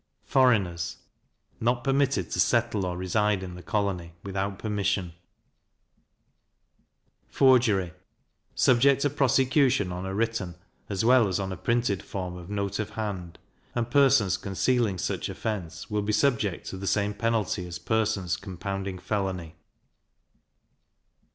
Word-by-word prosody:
Foreigners 100 Hz, -10 st, +2 dB, 0.6 s
not 120 Hz, +1 st, +1 dB
permitted 135 Hz, +1 st, +1 dB
to -, -, -2 dB
settle 115 Hz, -5 st, +2 dB
or 90 Hz, 0 st, -3 dB
reside 100 Hz, +2 st, +1 dB
in 90 Hz, -1 st, -7 dB
the 90 Hz, -, -9 dB
colony, 95 Hz, -5 st, -2 dB
without 95 Hz, 0 st, -3 dB
permission. 100 Hz, -4 st, -1 dB, 2.1 s
Forgery 115 Hz, -10 st, +3 dB, 0.6 s
subject 135 Hz, +2 st, +4 dB
to 145 Hz, -, +2 dB
prosecution 135 Hz, -5 st, +2 dB
on 90 Hz, +1 st, -4 dB
a 95 Hz, -, -4 dB
written, 110 Hz, -5 st, -1 dB, 0.3 s
as 100 Hz, +1 st, -1 dB
well 125 Hz, -2 st, +6 dB
as 95 Hz, +1 st, -1 dB
on 95 Hz, -1 st, -3 dB
a -, -, -3 dB
printed 115 Hz, +1 st, 0 dB
form 90 Hz, -2 st, -5 dB
of 90 Hz, 0 st, -10 dB
note 100 Hz, 0 st, -2 dB
of 105 Hz, -1 st, -2 dB
hand; 100 Hz, -5 st, -5 dB, 0.4 s
and 120 Hz, -1 st, -1 dB
persons 115 Hz, -10 st, +4 dB
concealing 105 Hz, +1 st, 0 dB
such -, -, -2 dB
offence, 90 Hz, -7 st, -5 dB
will 105 Hz, 0 st, +1 dB
be 105 Hz, +1 st, -1 dB
subject 105 Hz, -5 st, +1 dB
to 95 Hz, -, -6 dB
the 95 Hz, +1 st, -5 dB
same 105 Hz, +1 st, +1 dB
penalty 110 Hz, -4 st, -1 dB
as 90 Hz, 0 st, -6 dB
persons 100 Hz, -2 st, 0 dB
compounding 95 Hz, 0 st, -5 dB
felony. 90 Hz, -4 st, -3 dB
100 Hz, 130 wpm, -27 LUFS, 95-115 Hz, 2.1 s, well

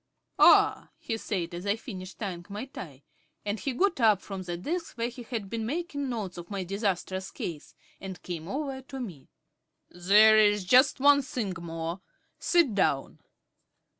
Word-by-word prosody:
"Ah," -, -, +6 dB
he 225 Hz, -, -3 dB
said, 185 Hz, -6 st, -3 dB
as 175 Hz, +3 st, -6 dB
I 200 Hz, -, +3 dB
finished 190 Hz, -5 st, -9 dB
tying 185 Hz, -5 st, -5 dB
my 205 Hz, +5 st, -5 dB
tie; 145 Hz, -, -10 dB, 0.4 s
and 205 Hz, +1 st, -2 dB
he 275 Hz, -, -2 dB
got 350 Hz, +6 st, +1 dB
up 215 Hz, -4 st, +5 dB
from 195 Hz, -1 st, -7 dB
the 175 Hz, -1 st, -4 dB
desk 330 Hz, -, -4 dB
where 230 Hz, +1 st, -1 dB
he 245 Hz, +1 st, -10 dB
had 225 Hz, -4 st, -5 dB
been 225 Hz, +3 st, -3 dB
making 285 Hz, +1 st, -3 dB
notes 210 Hz, -7 st, -4 dB
of 170 Hz, -, -10 dB
my 200 Hz, -2 st, -3 dB
disastrous 190 Hz, -1 st, -2 dB
case, 160 Hz, -4 st, -7 dB, 0.2 s
and 190 Hz, -1 st, -7 dB
came 170 Hz, -2 st, -5 dB
over 270 Hz, +2 st, -3 dB
to 265 Hz, +1 st, -9 dB
me. 175 Hz, -, -7 dB, 0.6 s
"There 210 Hz, +5 st, +6 dB
is 205 Hz, -2 st, +3 dB
just 255 Hz, +8 st, +5 dB
one 285 Hz, +1 st, +6 dB
thing 235 Hz, -7 st, -3 dB
more. 165 Hz, +2 st, -5 dB, 0.4 s
Sit 340 Hz, -10 st, +3 dB
down." 140 Hz, -8 st, 0 dB
205 Hz, 165 wpm, -28 LUFS, 180-250 Hz, 0.6 s, Ah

